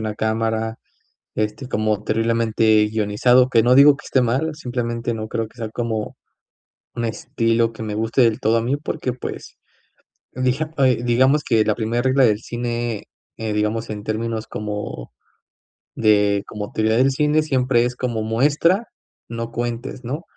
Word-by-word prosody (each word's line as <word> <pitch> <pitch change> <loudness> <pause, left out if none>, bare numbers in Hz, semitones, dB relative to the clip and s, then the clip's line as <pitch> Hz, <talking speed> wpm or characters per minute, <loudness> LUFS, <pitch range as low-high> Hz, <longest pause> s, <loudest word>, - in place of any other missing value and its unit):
una 110 -1 -3
cámara, 110 +1 -1 0.6
este, 110 +5 -3
como 110 -3 -1
terriblemente 110 -1 +2
guionizado, 115 +4 +3
que 115 -3 +4
no 125 +2 +4
digo 140 +1 +7
que - - -14
esté 130 - +2
mal, 135 +7 0
simplemente 120 -4 -3
no 110 0 -5
creo 115 0 -3
que 115 - -24
sea 115 -2 -4
como 110 -2 -3 0.8
un 120 - -3
estilo 115 0 0
que 115 - -8
me 105 -1 -4
guste 115 +4 +1
del 115 -2 +1
todo 110 +2 +3
a 115 - +1
mí, 125 +4 0
porque 145 -3 -3
pues 125 - -7 0.8
dija 130 +5 -1
eh, 130 -4 +3
digamos 130 +5 +3
que 115 -3 +3
la 110 - +2
primer 120 +2 -1
regla 130 0 +4
del 105 -3 +3
cine, 120 -2 -3 0.3
eh, 110 -1 -3
digamos, 105 +2 -1
en 105 -1 -5
términos 110 0 -3
como 105 - -6 0.8
de 105 -2 +3
como 105 -1 -6
teoría 110 +1 +1
del 130 +2 +4
cine, 150 +3 +2
siempre 130 -4 +2
es 125 - -2
como 120 -3 -2
muestra, 145 - +2 0.4
no 115 0 -5
cuentes, 120 +2 -4
¿no? 140 +8 -4
115 Hz, 160 wpm, -21 LUFS, 110-125 Hz, 0.8 s, digo